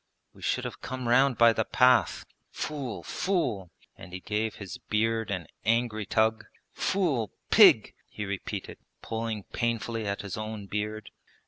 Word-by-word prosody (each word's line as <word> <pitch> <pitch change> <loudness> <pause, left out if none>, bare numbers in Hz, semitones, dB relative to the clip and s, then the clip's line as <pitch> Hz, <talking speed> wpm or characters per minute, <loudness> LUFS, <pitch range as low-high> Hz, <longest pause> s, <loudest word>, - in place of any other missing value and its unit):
We - - -17
should - - 0
have - - -6
come 130 -1 -5
round 130 +2 +4
by 115 -1 +6
the 110 - +1
path.... 125 +3 +3 0.2
Fool! 140 -7 -5
fool!' 165 - -1 0.3
and 90 +1 -12
he 95 - -4
gave 105 +3 -2
his 100 -4 -8
beard 110 0 0
an 90 -4 -3 0.2
angry 110 -2 +1
tug. 110 +1 +1 0.3
Fool! 150 - 0 0.2
Pig!' - - +7 0.2
he 105 - -5
repeated, 100 -1 -5 0.2
pulling 110 -2 -3
painfully 115 -1 -1
at 100 0 -3
his 100 - -5
own 110 -1 -5
beard. 105 +1 -4
110 Hz, 145 wpm, -28 LUFS, 105-120 Hz, 0.3 s, Pig